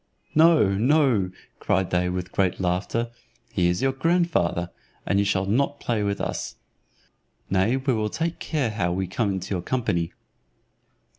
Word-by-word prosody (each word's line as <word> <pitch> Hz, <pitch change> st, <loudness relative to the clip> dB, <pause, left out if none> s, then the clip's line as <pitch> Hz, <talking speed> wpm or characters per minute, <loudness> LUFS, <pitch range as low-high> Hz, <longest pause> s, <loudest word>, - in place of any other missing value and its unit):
"No, 160 Hz, -, +6 dB
no," 115 Hz, -1 st, +3 dB, 0.3 s
cried 95 Hz, -1 st, 0 dB
they 90 Hz, 0 st, +1 dB
with 90 Hz, 0 st, -4 dB
great 95 Hz, -2 st, 0 dB
laughter, 95 Hz, +6 st, -1 dB, 0.4 s
"he 90 Hz, -3 st, +2 dB
is 90 Hz, +7 st, 0 dB
your 135 Hz, -, +3 dB
grandfather, 135 Hz, -, +1 dB, 0.3 s
and 100 Hz, -, +2 dB
you 100 Hz, -, +2 dB
shall 100 Hz, -1 st, +1 dB
not 140 Hz, +8 st, 0 dB
play 115 Hz, -3 st, -1 dB
with 100 Hz, -1 st, -1 dB
us. -, -, -3 dB, 1.0 s
Nay 95 Hz, +7 st, +2 dB
we 135 Hz, 0 st, 0 dB
will 110 Hz, -2 st, 0 dB
take 165 Hz, +7 st, -3 dB
care 140 Hz, -8 st, -1 dB
how 90 Hz, -5 st, -1 dB
we 95 Hz, +2 st, -1 dB
come 100 Hz, +4 st, -1 dB
into 95 Hz, +1 st, -4 dB
your 90 Hz, -, -1 dB
company." 90 Hz, -7 st, -1 dB
100 Hz, 155 wpm, -25 LUFS, 90-130 Hz, 1.0 s, No